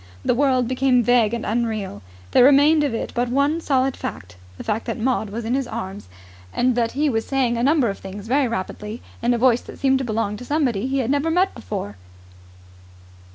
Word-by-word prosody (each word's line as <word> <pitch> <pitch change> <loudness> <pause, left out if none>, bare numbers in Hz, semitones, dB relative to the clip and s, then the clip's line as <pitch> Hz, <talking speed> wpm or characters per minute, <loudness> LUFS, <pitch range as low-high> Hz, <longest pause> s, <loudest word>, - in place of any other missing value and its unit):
The - - +3
world 255 -1 +2
became 255 -1 +2
vague 240 -3 +3
and 235 -1 -3
unreal. 215 - -2 0.3
There - - +6
remained 290 +3 +5
of 285 - 0
it - - -4
but 245 0 -1
one 285 +6 +1
solid 265 -3 +1
fact 90 -2 -7 0.2
the - - -7
fact 220 +1 -2
that - - -2
Maud 230 -2 0
was 225 +3 -5
in 230 - -1
his 270 -1 0
arms 205 - -6 0.4
and 255 - +1
that 235 -1 0
he 295 +3 +1
was 225 -5 0
saying 260 -3 +1
a 235 - -1
number 280 0 +3
of 200 - -4
things 195 +1 -8
very 265 +3 +2
rapidly 210 +1 -5 0.2
in 240 - +2
a - - -1
voice 245 0 +3
that - - -12
seemed 265 -1 +2
to - - -2
belong 215 -3 -2
to 250 - -9
somebody 255 -6 0
he 270 +1 -1
had 260 -1 0
never 285 +3 +1
met 360 +4 +2
before. 100 +1 -6
245 Hz, 210 wpm, -22 LUFS, 225-270 Hz, 0.4 s, There